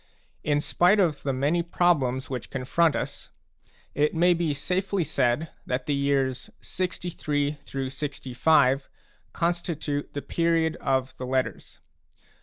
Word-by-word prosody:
In 145 -1 +1
spite 180 +7 +3
of 165 -7 +2
the 140 - -1
many 145 +6 +1
problems 145 -7 +1
which 125 -4 -5
confront 145 +5 +1
us, - - -4 0.6
it 150 +2 +1
may 175 +2 +5
be 170 -2 0
safely 185 +6 -1
said 140 0 +1 0.2
that 125 +1 -2
the 145 - 0
years 135 -2 0
63 150 -5 -2 0.3
65 135 0 +1 0.4
constitute 165 -4 -2
the 145 - -4
period 165 -1 +1
of 130 -1 -1
the 125 - -5
Letters. 130 0 -2
145 Hz, 120 wpm, -26 LUFS, 135-170 Hz, 0.6 s, may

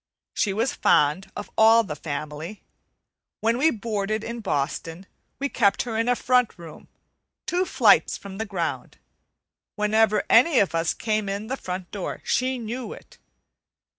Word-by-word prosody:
She 205 - 0
was 225 +6 0
fond 150 +6 +2
of 205 - -7
all 225 +1 +6
the 155 -8 -6
family. 150 +5 -6 0.8
When 230 +2 +1
we 310 +4 +5
boarded 215 -2 -2
in 235 +1 -5
Boston, 165 -1 -3 0.3
we 280 - -1
kept 215 -6 +2
her 235 -3 -5
in 230 +2 +1
a 245 - +3
front 250 -3 +1
room, 165 -3 -12 0.6
two 360 +1 0
flights - - +4
from 195 0 -10
the 220 - -3
ground. 175 -5 -4 0.8
Whenever 215 0 +2
any 260 +6 +5
of 200 -6 +3
us 165 0 0
came 215 -2 -1
in 200 +2 -3
the 255 +4 -3
front 185 -6 -6
door, 200 -3 -5
she 260 0 0
knew 235 +1 -5
it. - - -16
215 Hz, 155 wpm, -24 LUFS, 185-235 Hz, 0.8 s, all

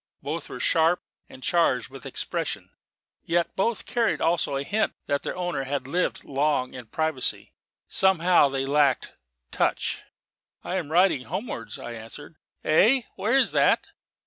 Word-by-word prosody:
Both - - -4
were - - -7
sharp 165 +2 +3 0.3
and 130 - -13
charged 145 -9 +2
with 135 -1 -9
expression; - - -3 0.5
yet 170 0 0
both 225 +4 0
carried 235 -2 +1
also 165 -4 +1
a 135 - -1
hint 215 +8 0
that 140 0 0
their - - -4
owner 175 -7 -2
had 135 -1 -2
lived 180 +6 -1
long 140 -2 0
in 125 -3 -9
privacy. 155 0 -1 0.3
Somehow 180 -5 +4
they 135 0 -2
lacked 140 -2 +2 0.4
touch. - - 0 0.6
"I 185 - -2
am 160 -5 -4
riding 170 -6 +3
homewards," 190 - -5
I 120 - -7
answered. 120 +7 -9 0.3
"Hey? 230 +11 +4
Where 230 +6 +2
is 270 - +3
that?" - - +3
160 Hz, 145 wpm, -26 LUFS, 135-180 Hz, 0.6 s, Somehow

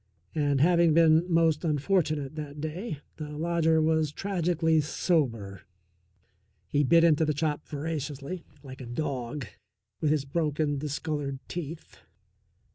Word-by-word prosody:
And, 145 -3 +1
having 170 -1 +4
been 165 +1 +5
most 165 -1 +3
unfortunate 155 -2 0
that 150 -1 -7
day, 155 +2 -4 0.2
the 150 -1 -6
lodger 165 0 +2
was 160 -1 +2
tragically 165 -3 +1
sober. 120 - -1 1.1
He 145 0 +2
bit 165 +4 +5
into 160 -2 +4
the 150 -1 0
chop 150 0 -1
voraciously, 150 +2 -4 0.2
like 130 -1 -10
a 125 - -7
dog, 130 +1 -3 0.5
with 155 - +1
his 150 -2 +1
broken, 150 -1 0
discoloured 145 -1 -3
teeth. 165 -1 -7
155 Hz, 120 wpm, -28 LUFS, 145-165 Hz, 1.1 s, been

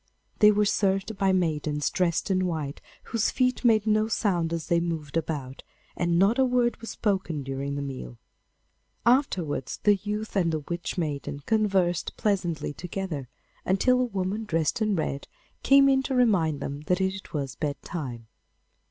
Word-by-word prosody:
They 210 - +8
were 210 0 +3
served 195 +1 +1
by 195 0 +2
maidens 155 -5 0
dressed 180 +1 0
in 185 -1 +2
white, 155 -5 -4 0.2
whose 225 -2 0
feet 255 -1 0
made 220 -3 +4
no 215 0 +2
sound 180 -7 0
as 165 -1 -3
they 170 -2 +2
moved 165 -4 -4
about, 145 -5 -3 0.3
and 170 -1 +1
not 200 +8 +3
a - - +6
word 245 -2 +2
was 230 - -7
spoken 190 -8 -1
during 135 +1 -3
the 140 - -3
meal. 130 - -7 0.9
Afterwards 190 - +1
the 205 -1 +5
youth 210 +2 -4
and 175 -4 +2
the 155 -1 -2
Witch 170 +5 -5
maiden 145 -3 -3
conversed 195 -6 +1
pleasantly 175 -8 -1
together, 175 -5 -5 0.3
until 250 +7 +3
a - - +2
woman, 200 -1 -2
dressed 165 +5 0
in 215 -2 +2
red, 140 -4 -3 0.3
came 275 0 +6
in 270 -1 +4
to 265 0 -2
remind 185 - +2
them 140 +1 -4
that 180 0 +2
it 190 0 -2
was 140 -3 -3
bedtime. 140 -5 -5
185 Hz, 160 wpm, -27 LUFS, 155-210 Hz, 0.9 s, They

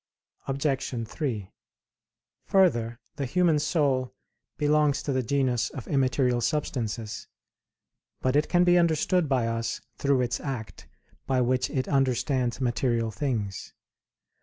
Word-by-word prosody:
Obj. 135 -4 -1
3: 110 -9 -4 1.0
Further, 120 -12 +3 0.2
the 140 - -1
human 170 +2 +3
soul 140 -5 0 0.4
belongs 150 -1 +2
to 140 - -1
the 130 - +1
genus 125 -2 0
of 130 - -8
immaterial 130 -3 +1
substances. 115 -6 -2 0.9
But 130 +1 0
it 150 - +2
can 175 0 +4
be 175 0 +5
understood 170 0 +2
by 130 -4 +2
us 115 0 -2 0.2
through 140 -2 +2
its 120 -1 -1
act 130 -6 -6 0.4
by 130 -1 +2
which 125 +1 +1
it 130 -2 -2
understands 130 -2 +1
material 120 -2 0
things. 105 -4 -3
130 Hz, 120 wpm, -27 LUFS, 120-145 Hz, 1.0 s, be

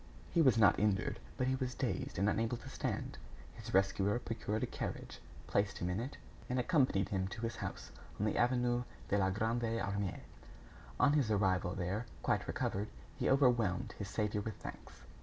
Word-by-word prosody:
He 170 - +4
was 130 -6 +5
not 105 -4 +6
injured, 100 -2 +1 0.2
but 130 - +1
he 130 - +2
was 130 -1 -2
dazed - - -2
and 100 +3 +2
unable 115 +3 +1
to 130 - -10
stand. - - -3 0.3
His - - -8
rescuer 95 +2 +3
procured 110 -2 -2
a - - +3
carriage, - - -5 0.3
placed 100 0 +1
him 90 +1 -1
in 90 - -1
it, 125 +4 -5 0.3
and 125 - 0
accompanied 125 - +2
him 95 -2 0
to 115 +4 -7
his 115 - -2
house - - -5 0.3
on 105 - +1
the 105 - +1
avenue 120 0 +2 0.3
de 100 - +3
la 95 -1 +3
Grande 110 +5 0 0.2
Armée. 100 -3 -2 0.8
On 145 - +5
his 140 -7 +3
arrival 95 -4 +2
there, 100 +6 -2 0.2
quite - - +1
recovered, 100 +2 -1 0.3
he - - 0
overwhelmed 120 -9 +3
his 100 -1 -4
saviour 105 -1 0
with 110 -1 -4
thanks. - - -10
105 Hz, 180 wpm, -35 LUFS, 100-125 Hz, 0.8 s, not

